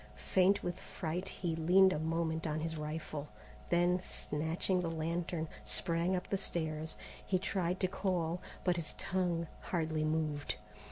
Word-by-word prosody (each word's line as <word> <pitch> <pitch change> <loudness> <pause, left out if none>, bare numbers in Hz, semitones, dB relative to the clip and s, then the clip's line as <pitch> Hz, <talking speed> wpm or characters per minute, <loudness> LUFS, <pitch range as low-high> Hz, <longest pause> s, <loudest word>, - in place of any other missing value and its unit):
Faint 190 +2 +3
with 175 - -2
fright 180 +2 -3
he 170 -3 -2
leaned 185 +4 +6
a - - -1
moment 160 0 0
on 155 0 -1
his 160 0 -2
rifle, 150 -1 -4 0.4
then, 175 +1 +4
snatching 165 +2 -1
the 170 - -1
lantern, 165 0 -1 0.2
sprang 170 - +1
up 180 - -2
the 195 - +2
stairs. 160 -4 -2 0.3
He 185 - +2
tried 185 -1 0
to 185 - +4
call, 180 -2 0 0.2
but 180 -1 +3
his 160 -3 -2
tongue 175 -2 0
hardly 160 -3 0
moved. 155 -2 0
170 Hz, 150 wpm, -35 LUFS, 160-180 Hz, 0.4 s, leaned